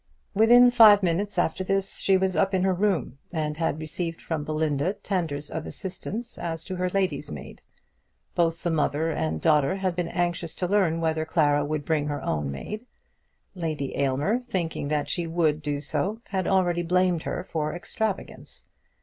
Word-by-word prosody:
Within 240 +4 +7
five 215 -4 +8
minutes 185 +3 0
after 175 +1 +1
this 195 +1 0
she 195 -1 +3
was 190 0 0
up 195 0 +2
in 185 - +1
her 190 0 +3
room, 175 - 0
and 155 -3 -2
had 160 -2 -1
received 165 +2 -3
from 160 -3 -3
Belinda 155 +2 0
tenders 160 -8 -3
of 160 0 -4
assistance 205 +5 -5
as 165 -1 -4
to 185 - -5
her 180 0 0
lady's 190 0 -1
maid. - - -9 0.7
Both 165 -2 0
the 175 - 0
mother 160 0 +1
and 80 - -2
daughter 150 - +3
had 190 -2 -1
been 175 -1 -1
anxious 175 -2 -2
to 180 - -2
learn 175 -4 +2
whether 160 -1 0
Clara 145 -3 +2
would 145 0 -3
bring 155 -2 0
her 145 -1 -2
own 75 -2 -1
maid. 210 - -6 0.7
Lady 155 -7 -3
Aylmer, 140 - +1
thinking 180 - -3
that 150 0 -1
she 175 -2 -2
would 160 -2 +1
do 145 -1 -2
so, 200 +9 -2
had 190 -2 -1
already 180 -3 +2
blamed 180 0 +2
her - - -3
for 155 -3 -3
extravagance. 205 +3 -4
170 Hz, 175 wpm, -26 LUFS, 155-190 Hz, 0.7 s, five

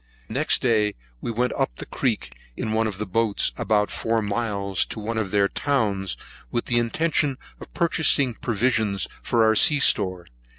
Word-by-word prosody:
Next 140 +6 0
day 110 -4 +2 0.3
we - - -4
went 120 +2 0
up - - -1
the - - -6
creek, - - -2 0.2
in 110 - -2
one 110 0 +1
of 100 -3 -5
the 105 - -3
boats, 105 +2 +2
about 105 -1 +1
four 115 0 0
miles, 100 -3 -1
to - - -5
one 110 +2 -3
of 105 -3 -2
their 100 0 +3
towns, 100 - -1 0.3
with 120 - -2
an 120 - +2
intention 140 +3 +1 0.2
of - - -11
purchasing 155 -6 +2
provisions 110 -4 0
for 115 -1 +2
our 110 0 +4
sea 145 +6 +5
store. 95 -9 +2
110 Hz, 170 wpm, -24 LUFS, 100-120 Hz, 0.3 s, sea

